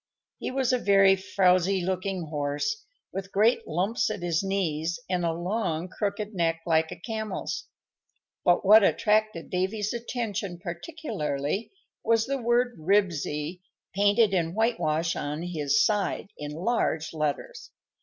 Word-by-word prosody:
He -, -, -3 dB
was 260 Hz, -1 st, 0 dB
a 250 Hz, -, +2 dB
very 195 Hz, -2 st, +5 dB
frowsy 190 Hz, 0 st, +2 dB
looking 185 Hz, 0 st, -2 dB
horse, 145 Hz, -, -2 dB, 0.3 s
with 195 Hz, 0 st, -5 dB
great 220 Hz, +5 st, +3 dB
lumps 185 Hz, +10 st, 0 dB
at 205 Hz, -4 st, -4 dB
his 170 Hz, -2 st, +1 dB
knees 175 Hz, -4 st, -1 dB
and 180 Hz, -1 st, -1 dB
a 165 Hz, -, +1 dB
long, 175 Hz, -1 st, -2 dB
crooked 205 Hz, +2 st, -3 dB
neck 165 Hz, -3 st, 0 dB
like 160 Hz, -1 st, +2 dB
a -, -, -5 dB
camel's; 220 Hz, +3 st, -4 dB, 0.8 s
but 175 Hz, +1 st, +3 dB
what 210 Hz, +2 st, +8 dB
attracted 215 Hz, -4 st, +1 dB
Davy's 200 Hz, +4 st, -1 dB
attention 225 Hz, -6 st, -3 dB
particularly 175 Hz, -, -3 dB, 0.3 s
was 225 Hz, 0 st, +3 dB
the 275 Hz, 0 st, -2 dB
word 240 Hz, +1 st, +1 dB
"RIBSY" 170 Hz, -2 st, 0 dB, 0.3 s
painted 205 Hz, +1 st, +3 dB
in 170 Hz, -1 st, 0 dB
whitewash 170 Hz, -8 st, +1 dB
on 150 Hz, +3 st, -3 dB
his 150 Hz, -5 st, +2 dB
side 205 Hz, -1 st, -1 dB
in 150 Hz, 0 st, -6 dB
large 160 Hz, -2 st, -1 dB
letters. 155 Hz, -, -3 dB
190 Hz, 135 wpm, -27 LUFS, 165-215 Hz, 0.8 s, what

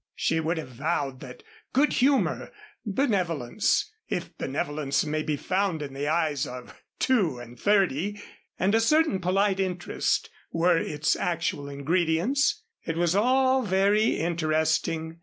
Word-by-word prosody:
She 160 Hz, -, 0 dB
would 165 Hz, +1 st, -1 dB
have 155 Hz, -5 st, -5 dB
vowed 135 Hz, 0 st, -2 dB
that 125 Hz, -2 st, -11 dB, 0.3 s
good 285 Hz, +3 st, +3 dB
humor, 270 Hz, +2 st, +1 dB, 0.3 s
benevolence 200 Hz, -, 0 dB, 0.2 s
(if -, -, -4 dB
benevolence 145 Hz, +1 st, -1 dB
may 155 Hz, 0 st, -1 dB
be 155 Hz, -1 st, -2 dB
found 185 Hz, -2 st, -1 dB
in 140 Hz, -2 st, -7 dB
the 140 Hz, +2 st, -3 dB
eyes 155 Hz, -3 st, 0 dB
of 125 Hz, 0 st, -9 dB, 0.2 s
two 195 Hz, -, +2 dB
and 120 Hz, 0 st, -11 dB
thirty), 200 Hz, -1 st, +1 dB, 0.4 s
and 190 Hz, +3 st, +1 dB
a 225 Hz, -, +4 dB
certain 305 Hz, -3 st, +3 dB
polite 195 Hz, +2 st, +1 dB
interest 180 Hz, -2 st, -1 dB, 0.2 s
were 170 Hz, +1 st, +3 dB
its 150 Hz, -2 st, 0 dB
actual 145 Hz, -4 st, -2 dB
ingredients. 175 Hz, -, +1 dB, 0.2 s
It 165 Hz, -, -3 dB
was 175 Hz, +1 st, +2 dB
all 260 Hz, +4 st, +3 dB
very 205 Hz, +1 st, +2 dB
interesting. 160 Hz, 0 st, 0 dB
170 Hz, 135 wpm, -26 LUFS, 150-205 Hz, 0.4 s, a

